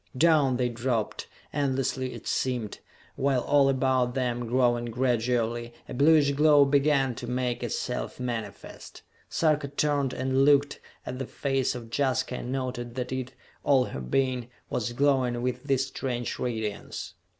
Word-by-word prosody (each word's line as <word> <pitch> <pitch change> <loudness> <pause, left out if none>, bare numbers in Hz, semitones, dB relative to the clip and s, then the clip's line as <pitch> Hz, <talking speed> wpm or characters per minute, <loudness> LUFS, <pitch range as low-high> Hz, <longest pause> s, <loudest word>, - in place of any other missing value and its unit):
Down 150 -5 +4
they 125 0 +1
dropped, 120 -2 -2 0.3
endlessly 135 -2 -1
it - - -10
seemed, 125 -5 -2 0.4
while 135 -2 +1
all 140 0 +4
about 130 -2 +1
them, 120 -2 -1
growing 120 -1 +2
gradually, 120 -1 0
a - - -7
bluish 145 +1 +5
glow 145 0 +5
began 140 -2 +2
to - - -7
make 125 -1 -1
itself 125 +2 -3
manifest. 115 -5 -6 0.3
Sarka 155 -3 +1
turned 145 -1 0
and 130 +1 +1
looked 145 0 +3 0.3
at 130 - -5
the 135 - -4
face 135 -2 -1
of 115 -2 -8
Jaska 130 -2 0
and 125 - -5
noted 125 -2 -4
that 125 -1 -3
it 130 -1 -4 0.3
all 135 -3 +4
her 65 - -6
being 125 - 0 0.2
was 120 0 -2
glowing 130 -2 +2
with 125 +1 -2
this 135 -1 +1
strange 120 -3 -3
radiance. 110 -4 -4
130 Hz, 145 wpm, -27 LUFS, 120-135 Hz, 0.4 s, bluish